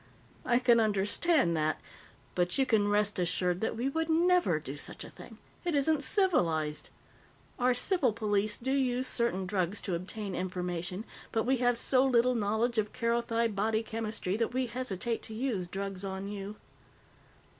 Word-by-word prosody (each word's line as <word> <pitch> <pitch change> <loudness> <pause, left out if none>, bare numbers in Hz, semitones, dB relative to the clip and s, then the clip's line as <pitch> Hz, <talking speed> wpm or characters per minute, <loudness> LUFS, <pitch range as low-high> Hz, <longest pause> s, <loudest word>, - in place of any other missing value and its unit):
"I 240 - +3
can 245 -2 +4
understand 210 - +2
that. 155 0 0 0.5
But 175 0 0
you 270 - +3
can 215 -5 +2
rest 205 -1 +1
assured 180 0 0
that 220 - -1
we 245 +3 -1
would 320 +4 -1
never 350 +2 +3
do - - -7
such - - -6
a - - -10
thing. - - -12 0.3
It 345 -4 0
isn't 290 +1 +2
civilized. 175 - +1 0.7
Our 250 0 +3
civil 275 - +2
police 210 -1 0
do 265 +3 -3
use 260 -2 +1
certain 235 -7 0
drugs 185 +1 -1
to 190 - -3
obtain 195 +3 -4
information, 180 +2 -3 0.3
but 225 - +1
we 260 +2 +2
have 245 -1 +2
so 255 +2 +3
little 250 -1 +3
knowledge 225 +1 0
of 210 -1 -2
Kerothi 235 0 0
body 220 +2 0
chemistry 220 -4 -3
that 230 +2 -1
we 260 0 +1
hesitate 235 -2 -2
to 220 - -6
use 220 -7 -2
drugs 195 +1 -5
on 190 0 -4
you." 205 0 -6
220 Hz, 165 wpm, -30 LUFS, 195-250 Hz, 0.7 s, can